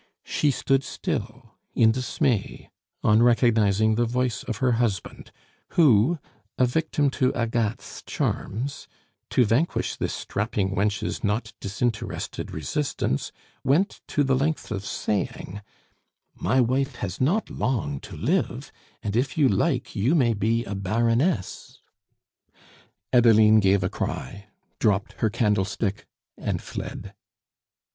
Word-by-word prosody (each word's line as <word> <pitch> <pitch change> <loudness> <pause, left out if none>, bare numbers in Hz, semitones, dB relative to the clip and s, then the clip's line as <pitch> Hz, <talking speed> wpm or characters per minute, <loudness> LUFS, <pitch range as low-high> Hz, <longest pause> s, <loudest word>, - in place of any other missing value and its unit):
She 150 - +1
stood 135 0 +1
still 120 - -5 0.2
in 115 -2 +5
dismay 125 -2 -1 0.3
on 105 +2 +5
recognizing 110 -3 +4
the 120 +2 +2
voice 125 0 -1
of 115 - -4
her 130 +1 +2
husband, 115 -4 -2 0.5
who, 145 0 +5 0.4
a 130 - +4
victim 145 +1 0
to 130 -1 +1
Agathe's 115 -2 -2
charms, 130 +7 -3 0.4
to 125 - +3
vanquish 120 +11 0
this - - -2
strapping 100 -2 -2
wench's 100 +1 -1
not 110 +1 -1
disinterested 110 +2 -3
resistance, 80 - -2 0.3
went 165 +10 +1
to 145 - +1
the 135 -1 +2
length 145 +1 -1
of 100 -2 -3
saying: 105 -1 -3 0.7
"My 120 +8 +1
wife 130 +2 +1
has 100 -2 -5
not 180 +12 +1
long 90 - -1
to - - -10
live, - - -1 0.3
and 105 0 -2
if 130 +5 0
you 145 -3 +5
like 125 - 0
you 120 - +2
may 120 -7 +3
be 115 +3 0
a 100 - -5
Baroness." 115 - 0 1.3
Adeline 110 -3 +6
gave 95 -1 +3
a 90 - 0
cry, 100 +11 -5 0.3
dropped 100 -3 +1
her 110 - +2
candlestick, 105 -2 -1 0.3
and - - -2
fled. - - -7
115 Hz, 120 wpm, -25 LUFS, 105-130 Hz, 1.3 s, Adeline